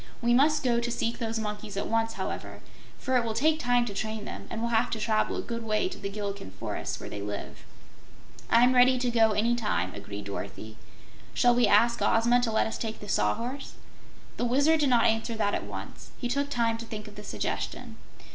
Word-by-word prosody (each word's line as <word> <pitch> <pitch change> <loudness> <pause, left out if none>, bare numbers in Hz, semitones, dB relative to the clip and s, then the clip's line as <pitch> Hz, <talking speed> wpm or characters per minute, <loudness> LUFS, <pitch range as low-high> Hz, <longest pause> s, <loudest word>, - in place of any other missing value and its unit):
"We 240 0 +2
must 300 +5 +4
go 240 -2 +2
to 235 0 -2
seek 230 0 -2
those 225 -1 -2
monkeys 210 -1 -5
at - - -1
once, 225 0 0
however, - - -5 0.4
for 260 -1 +1
it 245 - +2
will 225 -1 -3
take 310 +6 +3
time 245 -3 +2
to 210 - -5
train 220 +1 -3
them - - -7
and 225 - -4
we'll 235 +1 -1
have 230 +1 +2
to 220 - -3
travel 215 0 +1
a - - -3
good 235 -1 -4
way 215 +8 +1
to 370 - -9
the 200 - -4
Gillikin 200 - -5
forests - - -4
where - - -7
they 100 - -6
live." 100 -9 -6 0.9
"I'm 245 +2 +5
ready 255 +1 +6
to 250 -1 0
go 225 -2 +4
any 230 +3 +2
time," 210 - -1
agreed 100 0 -7
Dorothy. 110 +2 -7 0.6
"Shall 245 0 +5
we 245 0 +4
ask 235 0 +4
Ozma 235 +2 +4
to 235 -2 0
let 220 - +2
us 220 - -4
take 225 -1 -4
the 205 - -9
Sawhorse?" 230 - -1 0.6
The 245 - 0
Wizard 285 +6 +3
did 290 -2 +3
not 240 -2 +4
answer 225 +1 +1
that 205 -2 0
at - - -2
once. - - -8
He 245 - -3
took 280 +3 -1
time 230 -3 0
to 230 - -6
think 215 -1 -7
of 210 - -11
the 210 0 -10
suggestion. - - -4
230 Hz, 220 wpm, -28 LUFS, 210-245 Hz, 0.9 s, ready